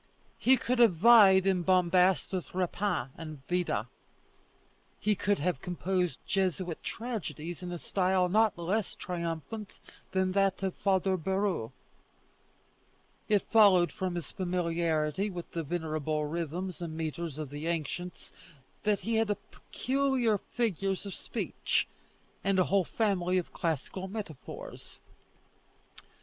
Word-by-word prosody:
He 260 +1 +5
could 245 +1 -1
have 230 -7 +6
vied 195 -1 +7
in 190 -2 +2
bombast 185 +1 +3
with 180 -1 -4
Rapin 185 -5 -1
and 155 -4 -8
Vida. 175 - 0 1.1
He 210 - +2
could 205 +1 +1
have 175 +4 -1
composed 180 -1 -1
Jesuit 185 -3 -1
tragedies 175 - -5
in 180 -1 -5
a 175 - -3
style 185 +3 +1
not 215 +2 +3
less 190 +5 -1
triumphant 175 +4 -4 0.4
than 190 0 +1
that 195 0 +1
of 190 -2 0
Father 190 -1 +1
Bouhours. 190 - -1 1.6
It 205 -2 +3
followed 195 -6 +6
from 185 -2 -3
his 170 -5 -5
familiarity 170 -1 0
with 175 -3 -7
the 165 - -2
venerable 155 -1 -2
rhythms 170 +3 -4
and 160 -2 -5
metres 160 -1 -4
of 150 -3 -5
the 145 +3 -5
ancients, 170 +2 -4 0.5
that 210 -1 +1
he 225 0 0
had 210 -2 +1
peculiar 260 -5 0
figures 195 -5 -2
of 200 - -5
speech, - - -2 0.6
and 195 -1 +2
a 185 - +5
whole 195 0 +2
family 185 -4 +1
of 180 - -3
classical 165 +4 -2
metaphors. 195 -8 -8
185 Hz, 125 wpm, -30 LUFS, 170-200 Hz, 1.6 s, vied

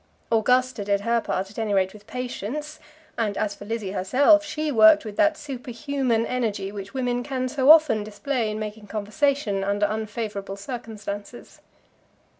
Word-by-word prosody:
Augusta 250 0 +2
did 200 0 +1
her 235 +2 +1
part 190 -1 -3
at 215 - -8
any 215 -2 0
rate 190 -1 +1
with 210 0 -15
patience; 255 +4 -5 0.4
and 210 -3 0
as 210 -1 -1
for 205 - -11
Lizzie 215 -3 -3
herself, 270 - +4
she 305 0 -3
worked 215 -3 +6
with 210 -1 -6
that 310 +3 +3
superhuman 255 -3 -2
energy 215 -6 -2
which 200 +3 -8
women 245 -2 0
can 255 0 -2
so 265 +1 +1
often 305 -9 +7
display 215 +3 -2
in 215 - -3
making 215 0 -6
conversation 215 -1 0
under 200 +1 +1
unfavourable 210 -2 -4
circumstances. 215 -1 -7
220 Hz, 155 wpm, -24 LUFS, 205-255 Hz, 0.4 s, often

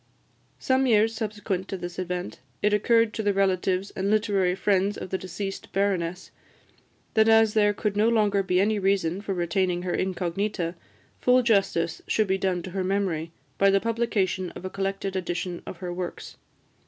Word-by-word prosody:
Some 260 0 +1
years 225 -1 +4
subsequent 210 -4 -3
to 195 - -4
this 175 0 -6
event, 180 - -4 0.2
it 210 0 +3
occurred 230 +1 +3
to - - -2
the 205 -2 +1
relatives 190 0 +1
and 195 +1 -2
literary 200 -4 +2
friends 195 +1 +1
of - - -7
the 190 - 0
deceased 195 +2 -6
Baroness 185 -3 -1 0.8
that 220 0 +4
as 225 -1 +5
there 210 -1 +4
could 205 0 -2
no 215 +2 +3
longer 210 -3 +2
be 185 -1 +1
any 210 +2 +2
reason 190 -2 +1
for 200 -2 -3
retaining 175 +1 0
her 180 - -2
incognita, 185 -1 -2 0.5
full 250 0 +4
justice 195 -7 +1
should 215 - +2
be 190 -1 0
done 185 -2 0
to 185 - -7
her 190 0 -2
memory 185 -4 -1 0.3
by 195 - +5
the 195 0 +4
publication 215 -5 -1
of - - -8
a 185 - -4
collected 195 0 -3
edition 175 -1 -3
of - - -7
her 180 0 -5
works. 180 0 -6
195 Hz, 175 wpm, -26 LUFS, 180-210 Hz, 0.8 s, as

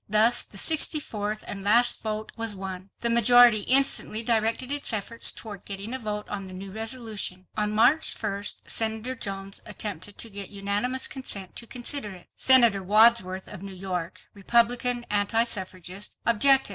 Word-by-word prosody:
Thus 220 +3 +5
the 195 - -12
sixty 315 +5 +3
fourth 215 -5 -5
and 195 -1 -6
last 235 +4 +3
vote 215 0 -4
was 225 -2 0
won. 190 0 -7
The 235 - +1
majority 235 -1 +6
instantly 250 -1 +3
directed 230 +3 0
its 290 0 -3
efforts 220 +2 +1
toward 210 -4 -10
getting 200 +4 -6
a 260 - -4
vote 210 -2 -5
on 195 -2 -6
the 185 - -10
new 190 +1 -9
resolution. 220 -4 -5
On 210 -1 -1
March 285 +8 +3
1st 205 -1 -4
Senator 220 +3 0
Jones 195 -4 -6
attempted 205 -1 -5
to 230 - -2
get 200 -1 -5
unanimous 205 +6 -2
consent 200 -8 -4
to 235 - -3
consider 250 -2 -2
it. 180 -2 -16
Senator 235 -7 +5
Wadsworth, 200 -2 +3
of 205 -3 -10
New 195 -1 -9
York, 180 -2 -5
Republican 240 +3 +1
anti 210 +3 +2
suffragist, 190 -3 -3
objected. 270 +3 +4
215 Hz, 160 wpm, -25 LUFS, 195-235 Hz, -, majority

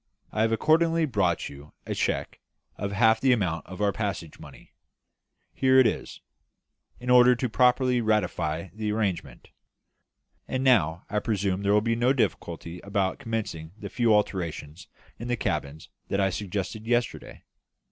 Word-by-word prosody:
I 110 - -1
have 110 0 +2
accordingly 165 +6 +3
brought 100 - 0
you 70 +1 -12
a - - -3
cheque - - -2 0.4
for 100 - -4
half 110 +1 +3
the 130 - +4
amount 90 -8 -1
of 95 +2 -8
our 100 - +3
passage 100 -7 -4
money - - -14 0.8
here 130 0 +3
it 130 - +7
is 110 - -2 0.8
in 125 0 -2
order 125 0 +7
to 125 +1 -1
properly 125 +1 +3
ratify 90 -6 -1
the 105 0 -3
arrangement; 95 - -3 1.0
and 130 0 -2
now 90 - +3
I 105 - -1
presume 100 -3 -1
there 100 0 +2
will 105 - +4
be 115 +1 0
no 120 +3 +2
difficulty 90 - -2
about 100 -1 -1
commencing 100 -8 -4
the - - -7
few 120 -3 +1
alterations 90 -6 -1 0.3
in 120 - -6
the 120 0 -1
cabins 75 -6 -3 0.2
that 100 - -1
I 95 -1 +2
suggested 105 +3 -4
yesterday?" 120 -1 -2
105 Hz, 155 wpm, -26 LUFS, 90-120 Hz, 1.0 s, it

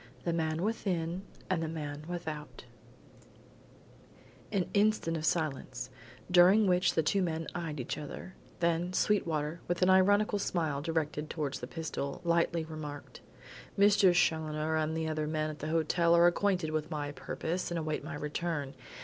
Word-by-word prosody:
THE 170 - 0
MAN 160 0 -1
WITHIN 185 -5 -1 0.3
AND 185 -3 0
THE 165 - -1
MAN 150 -2 -5
WITHOUT 160 -4 -6 1.9
An 190 -4 0
instant 205 -5 +2
of 160 -1 -2
silence, 155 -5 -2 0.4
during 185 +4 +7
which 180 -1 +3
the 160 - +3
two 195 +6 +2
men 165 -2 -1
eyed 160 -4 -4
each 125 - -3
other; 150 +5 -8 0.3
then, 170 +1 +1
Sweetwater, 165 -6 0
with 175 +1 0
an 185 - +5
ironical 205 +2 +4
smile 160 -7 -1
directed 155 -1 -2
towards 145 -4 -3
the - - -6
pistol 160 -4 -4
lightly 170 -1 +2
remarked: 150 -2 -8 0.6
"Mr. 200 -2 +6
Challoner 160 -2 +1
and 160 +1 0
other 155 -1 -1
men 155 0 -1
at 150 - -10
the 155 - -4
hotel 170 +1 +3
are 170 0 +6
acquainted 180 -2 +2
with 155 0 -2
my 145 -3 -3
purpose 170 +4 -3
and 175 - -2
await 155 -2 -2
my - - -6
return. 150 -1 -3
165 Hz, 150 wpm, -31 LUFS, 155-180 Hz, 1.9 s, during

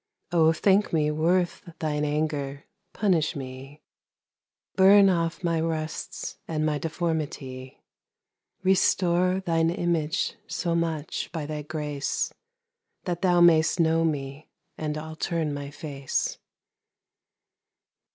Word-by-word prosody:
O 160 -2 +5
thinke 195 +5 +2
mee 150 -2 +2
worth 175 +4 +1 0.2
thine 150 -1 -1
anger, 145 -2 -2 0.3
punish 175 -6 +1
mee. 135 +2 -8 0.9
Burne 195 +1 +7
off 170 0 -1
my 165 -2 +1
rusts, 160 -1 -4
and 155 -1 -1
my 150 -1 0
deformity, 150 -5 -4 0.8
Restore 185 -1 +3
thine 165 -2 +1
Image, 170 +1 -1
so 170 -5 -2
much, 165 -3 -2
by 160 -3 -4
thy 150 0 -4
grace, 150 -2 -3 0.7
That 175 -2 -3
thou 180 -2 +4
may'st 165 0 +5
know 165 0 +3
mee, 145 -2 -3 0.3
and 155 -1 -3
I'll 160 +1 -7
turne 160 -2 -1
my 145 0 -5
face. 140 -2 -3
160 Hz, 110 wpm, -26 LUFS, 150-175 Hz, 0.9 s, Burne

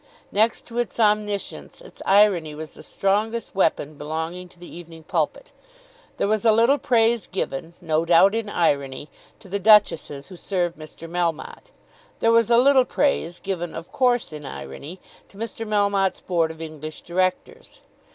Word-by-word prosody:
Next 220 +3 +1
to 235 0 -5
its 240 0 -3
omniscience 210 - 0
its - - -15
irony 190 -6 +4
was 155 0 -7
the - - -14
strongest 210 +3 -1
weapon 155 -5 0
belonging 160 +4 -5
to 175 - -21
the 175 - -12
"Evening 165 -2 -11
Pulpit." - - -2 0.7
There - - 0
was 215 0 0
a 225 - +5
little 235 +6 +4
praise 230 -3 +2
given, 165 -2 -4
no 160 -2 0
doubt 175 +4 +5
in 225 -2 -2
irony, 140 -6 0 0.3
to 205 - -14
the 200 +2 -3
duchesses 175 -9 +3
who 185 - -10
served 175 -2 -2
Mr. 155 +1 -11
Melmotte. 170 -2 -3 0.5
There 230 - +3
was 230 -1 +4
a 235 - +5
little 265 +1 +6
praise, 245 - 0
given 175 -4 -4
of 165 - -8
course 245 -8 +1
in 150 -1 -8
irony, 135 - -8 0.3
to 195 - -18
Mr. 225 0 -5
Melmotte's 200 -2 +1
Board 170 -3 0
of 160 0 -8
English 155 -1 -8
Directors. 185 +1 -3
185 Hz, 160 wpm, -23 LUFS, 160-220 Hz, 0.7 s, little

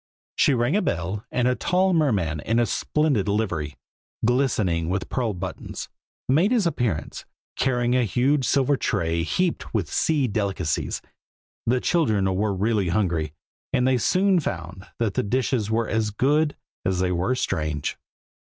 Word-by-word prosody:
She 140 - +4
rang 120 +7 +1
a 210 - +3
bell, 95 - -2
and 125 -1 +1
a 125 - +3
tall 185 +7 +1
merman 100 - +1
in 115 +9 0
a 120 - +4
splendid 140 -6 0
livery, 90 -8 -1 0.5
glistening 110 -10 +1
with 95 0 -2
pearl 115 -6 -1
buttons, 90 0 -6 0.4
made 160 - +3
his 235 -6 +3
appearance, 120 - -1 0.3
carrying 125 -1 +1
a 130 - +3
huge 130 +7 +2
silver 140 0 +2
tray 85 -8 0
heaped 170 - -1
with 95 -8 -1
sea 150 -5 +2
delicacies. 100 -6 -2 0.6
The 125 +2 +2
children 110 - +2
were 100 +1 0
really 100 -1 +1
hungry, 85 -6 0 0.4
and 125 - +2
they 130 -1 +3
soon 190 - +3
found 90 - -5
that 110 -4 0
the - - +1
dishes 120 -1 0
were 110 0 +1
as 110 0 0
good 145 +8 +1 0.3
as 95 0 0
they 90 0 +1
were 90 +8 0
strange. 75 - -2
110 Hz, 155 wpm, -24 LUFS, 95-130 Hz, 0.6 s, She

